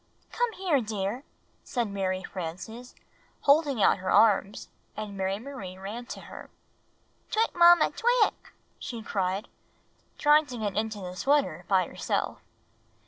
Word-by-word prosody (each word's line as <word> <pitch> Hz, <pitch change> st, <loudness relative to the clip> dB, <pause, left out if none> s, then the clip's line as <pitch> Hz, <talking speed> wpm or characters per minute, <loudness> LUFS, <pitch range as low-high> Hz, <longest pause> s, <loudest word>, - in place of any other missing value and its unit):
"Come 485 Hz, -1 st, 0 dB
here, 355 Hz, -9 st, +1 dB
dear," 215 Hz, +3 st, -3 dB, 0.4 s
said 240 Hz, -3 st, -2 dB
Mary 190 Hz, -2 st, -2 dB
Frances, 190 Hz, +9 st, -7 dB, 0.5 s
holding 280 Hz, -6 st, +3 dB
out -, -, +4 dB
her 185 Hz, -, -4 dB
arms, 210 Hz, -2 st, +3 dB, 0.3 s
and 210 Hz, -2 st, -5 dB
Mary 195 Hz, 0 st, -1 dB
Marie 220 Hz, -7 st, -8 dB
ran 215 Hz, +6 st, -7 dB
to -, -, -7 dB
her. -, -, -11 dB, 0.8 s
"Twick, 445 Hz, +1 st, +1 dB
Mamma! 345 Hz, -1 st, +7 dB
Twick!" 480 Hz, -1 st, +1 dB, 0.3 s
she 230 Hz, -3 st, -6 dB
cried, 195 Hz, 0 st, -2 dB, 0.7 s
trying 300 Hz, 0 st, +5 dB
to 250 Hz, -1 st, -7 dB
get 210 Hz, -3 st, -3 dB
into 215 Hz, -1 st, -2 dB
the 180 Hz, -1 st, -7 dB
sweater 225 Hz, -, +1 dB
by 190 Hz, -2 st, +3 dB
herself. -, -, -3 dB
220 Hz, 135 wpm, -28 LUFS, 190-280 Hz, 0.8 s, Mamma